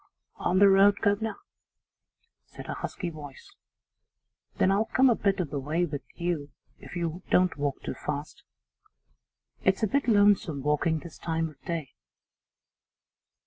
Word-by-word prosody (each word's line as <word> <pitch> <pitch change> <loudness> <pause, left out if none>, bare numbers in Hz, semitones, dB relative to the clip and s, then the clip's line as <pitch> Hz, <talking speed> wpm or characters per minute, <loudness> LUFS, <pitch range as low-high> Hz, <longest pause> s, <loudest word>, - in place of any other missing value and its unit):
'On 180 - 0
the 200 +1 +7
road, 195 +1 +6
guv'nor?' 210 +1 +1 1.1
said - - -11
a - - -4
husky 175 -3 -5
voice. 145 -4 -11 1.0
'Then 190 - +3
I'll 205 +3 +2
come 260 +3 +4
a - - +3
bit 195 -2 0
of 170 -6 -2
the 145 - -2
way 155 +6 0
with 145 -4 -5
you 170 -5 -2 0.3
if - - -11
you 170 0 -3
don't 185 0 +3
walk 145 -1 -3
too - - -3
fast. 150 0 -5 1.2
It's 190 +3 +2
a - - +4
bit 280 +6 0
lonesome 205 - +3
walking 150 +2 +1
this 170 -2 -11
time 165 -1 -1
of 145 -2 -18
day. 165 -6 -4
175 Hz, 145 wpm, -28 LUFS, 150-200 Hz, 1.2 s, the